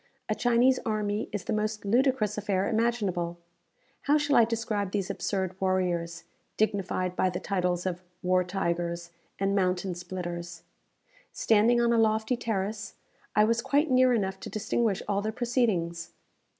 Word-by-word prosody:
A - - +2
Chinese 245 +2 +3
army 210 -1 -1
is 205 -3 -3
the - - -2
most 215 0 -2
ludicrous 235 -1 +2
affair 200 -2 0
imaginable. 205 -7 0 0.7
How 295 +1 +5
shall 290 -1 +1
I 235 - +7
describe 220 -3 -2
these 195 -1 -2
absurd 190 -2 -2
warriors, 175 -3 0 0.3
dignified 190 -3 0
by 185 - +2
the 180 - -4
titles 180 -2 -1
of 180 -1 -2 0.2
"War 180 0 +3
tigers," 170 -2 -2 0.3
and 195 0 0
"Mountain 185 -1 0
splitters?" 175 -1 -6 0.7
Standing 225 +2 +3
on 235 0 +3
a 230 - +3
lofty 220 +2 +2
terrace, 215 -2 -3 0.4
I 210 - +6
was 230 +2 +2
quite 290 +4 +1
near 255 0 +5
enough 190 -5 0
to - - -7
distinguish 220 -1 -1
all 200 -1 0
their 215 +1 -2
proceedings. 210 -9 0
205 Hz, 150 wpm, -28 LUFS, 180-230 Hz, 0.7 s, I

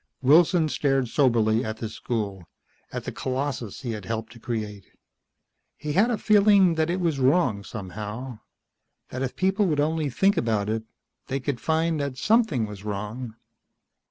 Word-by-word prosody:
Wilson 160 +4 +5
stared 135 -4 0
soberly 115 -4 +3
at 110 0 -4
this 110 -1 -5
school, 105 -6 -3 0.5
at - - -4
the - - -4
colossus 130 -5 -3
he 125 -3 -3
had 105 -4 -6
helped 110 +2 -4
to 120 - -14
create. 105 -5 -4 0.9
He 150 -1 -4
had 205 +8 +4
the 235 - 0
feeling 200 -4 +5
that 160 0 0
it 180 +2 0
was 165 -6 0
wrong 130 - +2
somehow, 105 +4 -6 0.7
that 130 - -5
if 130 -1 -2
people 190 +2 +2
would 150 -4 0
only 155 0 +1
think 195 +10 +2
about 110 -3 0
it 110 +1 -1 0.5
they 135 +1 -2
could 135 -2 -3
find 160 0 +1
that 140 -2 -3
something 210 - +2
was 105 -2 -9
wrong. 105 +3 -5
130 Hz, 160 wpm, -25 LUFS, 110-160 Hz, 0.9 s, Wilson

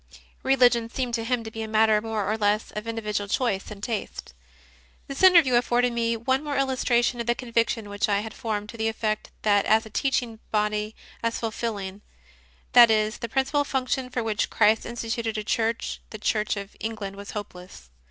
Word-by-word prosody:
Religion 245 -3 +3
seemed 245 0 -3
to 230 -1 -1
him 240 0 -1
to 220 - -7
be 225 - -6
a 220 - -4
matter 215 -1 +3
more 220 -2 -2
or 215 - 0
less 210 0 0
of 210 +2 -6
indi 225 0 -4
vidual 205 -1 -2
choice 215 -7 0
and 205 -1 -10
tastes. 220 - -4 0.7
This 275 0 -5
interview 340 -8 +7
afforded 240 0 +2
me 230 -1 0
one 260 +5 0
more 290 -2 -2
illustration 250 -2 +1
of 235 - -6
the 240 - +2
conviction 230 -2 -1
which 205 +1 -1
I 200 0 +2
had 220 0 -7
formed 210 -3 -4
to 230 - -9
the 220 0 0
effect 220 -1 -2
that 205 -2 +4
as 220 +1 +4
a 220 - -11
Teaching 240 -2 -1
Body 210 0 -1 0.3
as 230 0 -1
fulfilling, 210 -4 -4 0.7
that 240 -2 +9
is, 215 0 +1
the 235 - -5
principal 270 +4 +1
function 265 -1 -2
for 245 -2 -2
which 220 -1 -1
Christ 220 0 +3
instituted 230 -1 -3
a 215 - -2
Church 225 +2 -1
the 215 - -7
Church 210 0 0
of 200 0 -7
England 215 -3 -5
was 200 +1 -9
hopeless. 180 - -9
225 Hz, 190 wpm, -25 LUFS, 210-240 Hz, 0.7 s, that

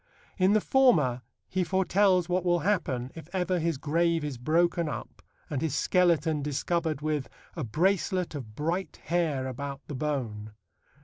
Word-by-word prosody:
In 185 +2 +4
the 215 - +4
former 155 - +3 0.3
he 185 -1 0
foretells 190 0 +2
what 180 0 0
will 175 -1 +2
happen 135 -11 0
if 160 -2 -10
ever 180 -1 0
his 165 -2 0
grave 165 +3 +1
is 140 -5 -4
broken 170 +4 +2
up - - -7 0.3
and 140 -3 -3
his 160 -4 -1
skeleton 165 -4 +2
discovered 155 +2 -1
with 150 -3 -1 0.3
A 160 - -3
bracelet 180 - 0
of 120 -8 -7
bright 170 +7 -2
hair 160 -6 0
about 135 +2 -5
the 145 - -7
bone. 120 -7 -3
160 Hz, 150 wpm, -28 LUFS, 140-180 Hz, 0.3 s, In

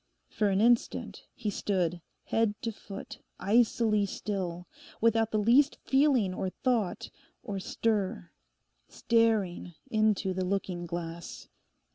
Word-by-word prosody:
For 210 -2 +1
an 195 +1 +2
instant 235 +1 +1
he 215 -3 -3
stood 180 -4 -1 0.2
head 225 -2 0
to 230 - -1
foot 200 -2 -9 0.2
icily 215 0 +3
still, 185 -4 -4 0.3
without 225 0 +3
the 215 - 0
least 245 +7 +4
feeling, 265 -8 +3
or 185 0 -2
thought, 225 -2 -1 0.3
or 205 -5 -4
stir—staring 210 -1 -1 0.2
into 215 -3 +2
the 185 0 -2
looking 180 -2 -2
glass. 170 0 -6
205 Hz, 110 wpm, -29 LUFS, 185-225 Hz, 0.3 s, least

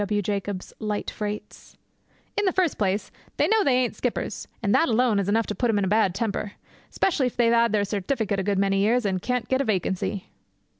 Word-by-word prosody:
W. 205 +1 0
Jacobs' 200 -1 -3
Light 210 -2 -3
Freights. 210 0 -6 0.6
'In 415 - +1
the 375 - +3
first 360 -4 0
place, 200 0 0 0.3
they - - +3
know 440 -1 +3
they 270 -6 +3
ain't 250 -1 +1
skippers, - - -3 0.2
and 200 - +2
that 330 - +4
alone 230 -2 +3
is 200 0 -1
enough 225 +2 +2
to - - -3
put 240 +2 0
'em 220 - +2
in 200 - +1
a - - -1
bad 200 -2 +2
temper, 205 -1 -2 0.4
especially 300 -8 +1
if 245 - -5
they've 235 -1 +4
'ad 235 -1 +4
their 205 -1 +2
certificate 205 0 -1
a - - -1
good 200 0 0
many 195 0 +2
years, 225 +4 +2
and 190 -2 0
can't 250 +2 -1
get 260 +1 +1
a - - +1
vacancy.' 195 -2 -1
210 Hz, 220 wpm, -25 LUFS, 200-245 Hz, 0.6 s, that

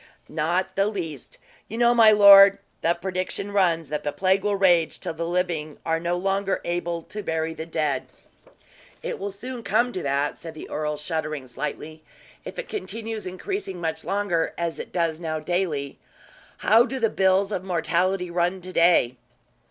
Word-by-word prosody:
"Not 170 +4 -1
the 195 +1 +2
least. 165 - -5 0.3
You 225 - -6
know, 240 0 +4
my 225 -2 +7
lord, 200 -1 +9 0.2
the 170 +1 +2
prediction 185 +2 -4
runs, 170 -6 +1
that 150 0 -3
the 145 - -1
plague 190 +1 +1
will 205 -1 +1
rage 175 -4 +3
till - - -4
the 165 +1 -4
living 170 -4 -2
are 165 0 +1
no 175 +1 -1
longer 195 +1 0
able 175 -1 -2
to 210 - -7
bury 160 -3 -2
the 160 0 -7
dead." 150 -5 -1 1.0
"It - - -4
will 200 +1 -3
soon 240 +5 -7
come 225 +4 +1
to 185 - -3
that," 140 0 -1
said 165 -1 -8
the - - -9
earl 150 0 -2
shuddering 155 -3 -4
slightly, 150 +4 -6 0.4
"if - - -8
it - - -5
continues 225 - -5
increasing 190 - -4
much 160 -1 -3
longer 195 -5 -1
as 170 -1 -3
it - - -7
does 165 -3 -1
now 160 -2 -3
daily. 155 -4 -2 0.6
How 225 +2 +5
do 265 - -4
the 230 -4 +1
bills 190 +1 +2
of 185 -3 -2
mortality 180 +1 0
run 175 +2 0
to 185 +1 -8
day?" 165 -8 +4
175 Hz, 175 wpm, -24 LUFS, 160-195 Hz, 1.0 s, lord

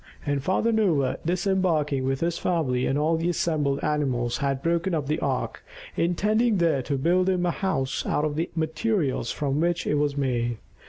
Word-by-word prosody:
And 145 -2 0
Father 190 +9 +1
Noah, 170 - +1
disembarking 170 -6 +1
with 135 0 -1
his 170 0 0
family 135 -8 0
and 135 - +1
all 160 +2 +2
the 165 +2 0
assembled 150 -5 0
animals, 130 -6 0
had 140 -2 -1
broken 170 +2 +1
up 150 -3 -1
the 150 +3 -1
ark, - - -2 0.3
intending 210 +6 +2
there 165 -6 +2
to 140 +2 -2
build 180 +6 +2
him 180 -1 +1
a 175 - +2
house 135 -9 -1
out 150 - +1
of 150 -1 -2
the 165 +3 -1
materials 160 - 0
from 145 0 -1
which 170 +1 0
it 150 - +1
was 145 -1 0
made. 120 -4 0
155 Hz, 180 wpm, -25 LUFS, 140-175 Hz, 0.3 s, all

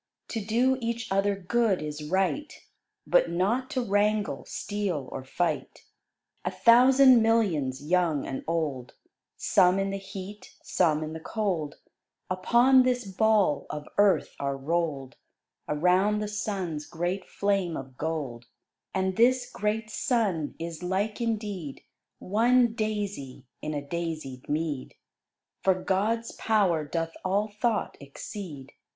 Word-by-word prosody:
To 225 -3 -3
do 250 +5 +2
each 230 -1 -3
other 200 +1 +2
good 200 +1 +1
is 150 0 -5
right, 195 - 0 0.5
But - - +3
not 210 +10 0
to 255 - -1
wrangle, 205 0 +1
steal, 195 -10 -3
or 130 - -5
fight. 155 +2 -2 0.6
A 180 - 0
thousand 250 +6 +6
millions, 170 - +1
young 165 -3 +1
and 135 - -5
old, 150 -7 -2 0.4
Some 180 +1 +4
in 195 0 0
the 195 - -2
heat, 195 +1 -9
some 155 -4 +1
in 155 0 -5
the 160 - -6
cold, 170 -5 -2 0.6
Upon 240 +8 +5
this 250 -2 +1
Ball 195 -6 +2
of 150 -1 -6
Earth 205 -2 +3
are 140 -1 -2
roll'd 145 -2 -2 0.5
Around 180 +7 +3
the 210 0 -2
Sun's 190 -7 -3
great 175 +3 -3
flame 195 -4 0
of 135 -1 -9
gold. 140 -7 -4 0.5
And 190 0 0
this 250 +1 +3
great 215 0 -2
Sun 200 - 0
is 165 0 -6
like 195 +5 -1
indeed 210 -10 -3 0.3
One 235 +4 +3
daisy 205 - -3 0.2
in 155 0 -3
a 145 - -3
daisied 155 -6 -5
mead; 150 -3 -2 0.7
For 190 -1 +3
GOD'S 210 +5 0
power 195 -8 +2
doth 165 +2 -3
all 200 +3 +1
thought 215 +1 -1
exceed. 140 0 -8
190 Hz, 130 wpm, -27 LUFS, 155-215 Hz, 0.7 s, thousand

